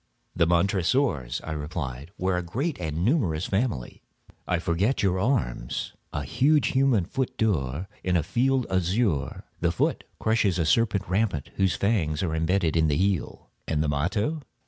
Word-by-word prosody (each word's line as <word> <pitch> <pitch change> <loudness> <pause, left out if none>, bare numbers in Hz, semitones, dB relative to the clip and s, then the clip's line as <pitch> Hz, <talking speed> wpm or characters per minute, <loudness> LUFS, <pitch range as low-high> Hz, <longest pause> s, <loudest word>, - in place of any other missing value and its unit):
"The 85 -1 +3
Montresors," 90 - +1
I 80 - -5
replied, 75 -2 -5
"were 95 0 0
a 90 - 0
great 130 - -3
and 80 +1 -2
numerous 100 - +1
family." 95 - -2 0.5
"I 90 - +1
forget 85 +10 0
your 95 -1 +2
arms." 95 - -1 0.2
"A 75 - -3
huge 140 - +3
human 130 -8 +3
foot 130 +6 -3
d'or, 85 - 0 0.2
in 90 -1 +2
a 80 - +1
field 130 - +1
azure; 95 - 0 0.2
the 85 0 +1
foot 85 - 0
crushes 110 -5 +1
a 85 - +1
serpent 105 +3 +2
rampant 95 -6 0
whose 95 -2 +2
fangs 95 -7 0
are 85 -4 -1
imbedded 80 +1 +1
in 80 -1 +3
the 75 -1 +1
heel." 95 -3 -1 0.2
"And 80 -1 +1
the - - 0
motto?" 100 - 0
90 Hz, 160 wpm, -26 LUFS, 80-110 Hz, 0.5 s, The